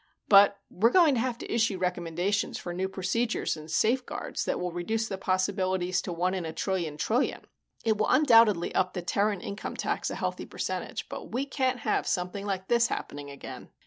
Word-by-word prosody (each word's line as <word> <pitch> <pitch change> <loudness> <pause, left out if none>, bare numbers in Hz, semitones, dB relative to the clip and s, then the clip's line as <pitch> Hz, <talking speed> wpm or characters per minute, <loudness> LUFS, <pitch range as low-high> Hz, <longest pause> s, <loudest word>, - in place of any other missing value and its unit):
But 200 0 +7
we're 220 +6 +3
going 325 0 +5
to 245 - +1
have 250 -1 -1
to - - -6
issue 225 -4 +2
recommendations 180 +2 -1
for 175 - -6
new 190 +2 -2
procedures 210 +5 -1
and 155 0 -10
safeguards 240 +10 0
that - - -1
will 180 0 -2
reduce 220 +6 -2
the 195 -2 -5
possibilities 185 -1 0
to - - -5
one 180 +2 0
in 185 -2 -2
a 160 - -4
trillion 170 -3 -2
trillion. 240 - 0 0.4
It 220 -2 +2
will - - +2
undoubtedly 230 - +5
up 185 0 +1
the 180 - -3
Terran 200 +1 0
income 200 +1 -6
tax - - -1
a - - -4
healthy - - -3
percentage, - - -4
but - - -8
we 260 +3 -1
can't 260 -3 -1
have - - 0
something 185 +2 -2
like 190 -1 -3
this 235 0 +4
happening 145 -8 -5
again. 140 - -9
195 Hz, 190 wpm, -28 LUFS, 180-225 Hz, 0.4 s, But